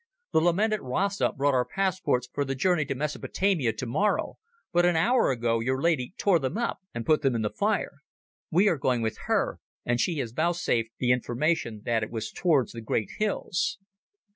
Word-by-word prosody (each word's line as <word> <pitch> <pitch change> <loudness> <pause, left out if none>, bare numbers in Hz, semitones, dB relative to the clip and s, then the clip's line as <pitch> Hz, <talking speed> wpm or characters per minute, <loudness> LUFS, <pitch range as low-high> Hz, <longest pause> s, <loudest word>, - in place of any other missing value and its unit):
The - - +3
lamented 205 +6 +2
Rasta 195 +11 0
brought 140 +1 +1
our 125 -1 +3
passports 185 -9 0
for 145 - 0
the 135 -1 -3
journey 155 +2 +2
to 135 -1 -3
Mesopotamia 150 - 0
tomorrow, 125 - -1 0.3
but 175 0 +4
an 175 -1 +3
hour 240 +10 +3
ago 115 -2 +1
your 130 +3 0
lady 155 0 0
tore 190 -5 +3
them 135 +7 -2
up 235 0 -2
and 115 -1 -5
put 155 -1 +3
them 135 -4 +1
in 110 - -1
the 105 - -1
fire. 205 -8 -1 0.5
We 185 +6 +4
are 170 -7 +2
going 125 -3 +1
with 110 -1 -2
her, - - +1 0.3
and 120 0 +1
she 165 -5 0
vouchsafed 125 -3 0
the 125 -1 +1
information 125 -2 0
that 115 -2 +1
it 110 - -3
was 110 -2 -4
towards 155 -8 +2
the 115 - -7
great 110 -1 -1
hills." 195 -4 -1
140 Hz, 185 wpm, -27 LUFS, 120-175 Hz, 0.5 s, but